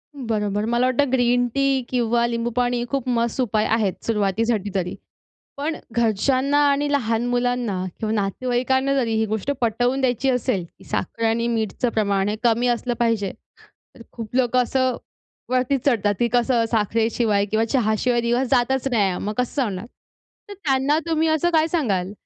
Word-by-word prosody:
बरोबर 210 -5 -2
मला 240 +2 +1
वाटतं 255 +1 +1
ग्रीन 245 -1 +2
टी 275 -1 +2
किंवा 235 -1 +1
लिंबू 235 0 -2
पाणी 245 -1 +1
खूप 275 -3 -2
मस्त 235 +1 0
उपाय 215 -3 +1
आहेत 215 -4 +1
सुरवातीसाठी 210 0 0
तरी. 180 -2 -1 0.6
पण 305 +3 -2 0.2
घरच्यांना 255 +5 +1
आणि 285 +1 +1
लहान 230 -4 0
मुलांना 245 -6 0 0.2
किंवा 220 -1 -1
नातेवाईकांना 255 +6 0
जरी 240 -5 0
ही 220 0 +1
गोष्ट 220 +5 -2
पटवून 245 +3 +1
द्यायची 260 +1 +1
असेल, 250 -7 0
की - - -16
साखर 230 +5 -3
आणि 230 +1 +1
मीठचं 225 +1 -1
प्रमाण 200 -3 0
हे 210 - -1
कमी 235 +1 +3
असलं 240 0 0
पाहिजे, 225 -5 +1 0.7
तर 235 - -12
खूप 230 -1 -8
लोकं 255 0 +3
असं 260 0 0 0.5
वरती 255 +2 +2
चढतात 210 -6 +2
ती 240 - +3
कसं 240 -1 +2
साखरेशिवाय 220 -1 +1
किंवा 220 +1 +2
चहाशिवाय 235 0 +1
दिवस 240 +2 0
जातच 265 0 +2
नाही, 195 -6 +1
मग 210 - -2
कसं 250 +3 0
होणार? 205 -3 -3 0.6
तर 405 - -7
त्यांना 290 -5 +1
तुम्ही 320 0 +1
असं 315 +2 +2
काय 320 -2 +3
सांगाल 205 - -1
240 Hz, 160 wpm, -22 LUFS, 220-260 Hz, 0.7 s, कमी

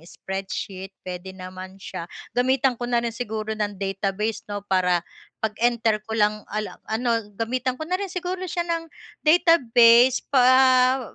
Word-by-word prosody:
spreadsheet, 190 +2 -6
puwede 185 +1 -7
naman 185 +1 -9
siya, 185 -3 -7 0.2
gamitan 260 +1 +2
ko 240 - -3
na 240 -1 +1
rin 230 - -2
siguro 220 -2 -4
ng 210 -2 -3
database 195 +2 -2
'no, 205 -1 -5
para 180 -3 +1 0.3
pag-enter 220 0 0
ko 220 +1 -4
lang 210 0 +2
al 215 0 -2 0.2
ano 230 -2 0
gamitan 255 +2 -1
na 320 +4 -3
rin 390 -1 -2
siguro 365 0 -4
siya 345 +1 -2
ng 330 -1 -3 0.3
database 255 -7 +5
pa 255 -1 +4
225 Hz, 140 wpm, -24 LUFS, 195-255 Hz, 0.3 s, database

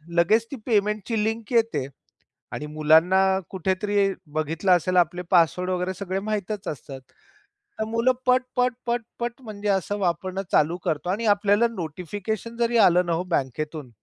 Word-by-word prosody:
लगेच 215 +7 +3
ती - - -4
पेमेंटची 210 -1 0
लिंक 225 +1 -3
येते 225 - +1 0.7
आणि 150 - -5
मुलांना 160 +5 +4 0.3
कुठेतरी 195 +2 0 0.2
बघितलं 160 +5 +1
असेल, 180 +1 +2
आपले 175 0 +2
पासवर्ड 180 +1 +3
वगैरे 185 0 -1
सगळे 190 0 -3
माहीतच 210 -1 -3
असतात. 135 -2 -7 0.8
तर - - +1
मुलं 230 +3 +2
पट, 255 0 +4
पट, 250 0 +2
पट, 240 0 0 0.2
पट 240 +2 -4
म्हणजे 210 -3 -6
असं 200 +1 0
वापरणं 185 +1 -1
चालू 165 +4 +3
करतो. 165 0 -1
आणि 210 +5 -1
आपल्याला 205 +3 +3
नोटिफिकेशन 195 +7 -5
जरी 235 0 +1
आलं 180 -4 +5
ना 170 - 0
हो 165 +2 -1
बँकेतून, 150 -3 -3
190 Hz, 150 wpm, -24 LUFS, 170-220 Hz, 0.8 s, आलं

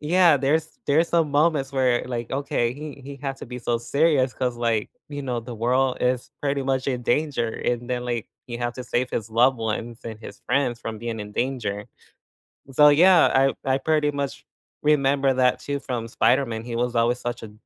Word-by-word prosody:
Yeah, 170 0 +4
there's 155 +4 0
there's 160 +4 +3
some 165 -3 +2
moments 145 -2 +2
where, 130 -2 +2
like, 120 -2 -4
okay, 130 -3 -1
he 150 -1 -8
he 140 +1 -8
had 135 -1 -4
to - - -9
be 125 +1 -7
so 120 -1 -1
serious 140 -1 +2
'cause 125 0 -1
like, 115 -3 0 0.2
you 145 -1 -5
know, 125 -3 -2
the 120 +1 -8
world 125 +3 +1
is 125 0 0
pretty 140 -1 0
much 130 0 -1
in 125 -2 -1
danger, 120 -2 0
and 120 +1 -3
then, 125 -1 -2
like, 120 -2 -3 0.2
he 120 -1 -6
had 120 -1 -2
to 125 - -7
save 125 0 -1
his 110 -1 -3
loved 125 +3 +4
ones 115 +1 -4
and 110 -2 -6
his - - -10
friends 125 -4 0
from 110 -1 -5
being 115 -1 -4
in 105 0 -7
danger. 110 -5 -2 0.9
So, 150 +3 +7
yeah, 170 +4 +6
I 135 0 +2
I - - +1
pretty 150 +1 +1
much 140 -1 -4 0.4
remember 140 -2 +3
that 125 -1 +2
too 140 0 -3
from 120 -4 -4
Spider-Man. 115 -1 +1
He 120 -1 -5
was 120 0 -1
always 120 +2 +2
such 120 -1 -4
a 105 - -10
130 Hz, 200 wpm, -24 LUFS, 120-140 Hz, 0.9 s, So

